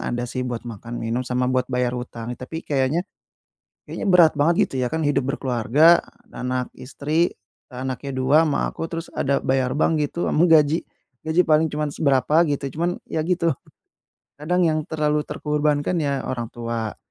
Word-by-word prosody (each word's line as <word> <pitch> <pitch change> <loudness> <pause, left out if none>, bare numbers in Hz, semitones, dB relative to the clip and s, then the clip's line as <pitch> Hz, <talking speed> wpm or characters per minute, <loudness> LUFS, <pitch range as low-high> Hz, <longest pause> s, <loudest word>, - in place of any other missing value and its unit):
ada 120 0 -2
sih 125 +1 -4
buat 120 -1 -5
makan 115 0 -7
minum 115 +2 -1
sama 125 0 0
buat 130 0 +1
bayar 125 -1 0
hutang. 120 -1 -6
Tapi 160 +7 -7
kayaknya 145 +5 0 0.8
kayaknya - - -5
berat 175 -4 +6
banget 155 +4 +4 0.2
gitu - - -9
ya, 125 - +1
kan 160 - -1
hidup 145 -3 +1
berkeluarga, 135 +7 +4 0.3
anak 125 0 -3
istri, 150 +6 -1 0.4
anaknya 130 +2 -4
2 135 +5 +4
sama 150 - 0
aku, 165 - -5
terus 165 0 -5
ada 140 0 0
bayar 130 -1 +1
bank 160 +1 +2
gitu 150 +3 -1
sama 160 - +3
gaji 160 -1 +4 0.4
gaji 160 +3 +2
paling 155 0 +3
cuman 150 0 -3
seberapa 135 -1 +1
gitu, 145 -1 -2 0.2
cuman 175 +1 0
ya 160 - -3
gitu. 170 -2 +2 0.9
Kadang 180 +4 +1
yang 155 -2 +2
terlalu 150 -1 +1
terkorbankan 150 +2 0
ya 140 -2 -1
orang 120 -3 -3
tua, 115 -2 -4
145 Hz, 165 wpm, -23 LUFS, 125-160 Hz, 0.9 s, berat